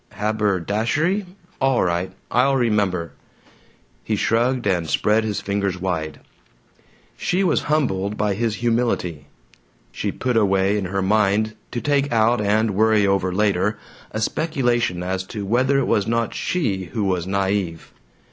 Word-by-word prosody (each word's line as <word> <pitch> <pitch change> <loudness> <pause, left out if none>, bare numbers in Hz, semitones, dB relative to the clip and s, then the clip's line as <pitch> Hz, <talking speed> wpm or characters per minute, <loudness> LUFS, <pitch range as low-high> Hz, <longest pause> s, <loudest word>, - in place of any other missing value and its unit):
"Haberdashery? 110 - 0 0.3
All 135 -2 +2
right. 90 +1 -1 0.2
I'll 135 +3 +3
remember." 100 -9 0 0.9
He - - -1
shrugged 120 +2 +1
and 90 -5 0
spread 105 +9 +2
his 105 -2 -2
fingers 100 -2 -2
wide. 80 -5 -3 0.9
She 185 +2 0
was 185 - +2
humbled 105 -9 0
by 105 -1 +1
his 110 +1 -1
humility; 115 -10 -1 0.6
she - - -3
put 125 -2 -1
away 95 -1 +2
in 100 - -3
her 95 +1 -2
mind, 105 +2 +2 0.2
to 120 - -4
take 145 -1 +1
out 115 0 +3
and 105 +2 +2
worry 110 +1 +3
over 95 -1 +1
later, 105 +1 +1 0.3
a 110 - -4
speculation 120 - 0
as 95 +1 -2
to 105 -2 -5
whether 130 +6 +2
it 135 - +2
was 105 -3 +1
not 115 0 0
she 105 - -1
who 105 +5 -3
was 90 -3 -1
naive. 95 -3 -2
105 Hz, 140 wpm, -22 LUFS, 95-120 Hz, 0.9 s, I'll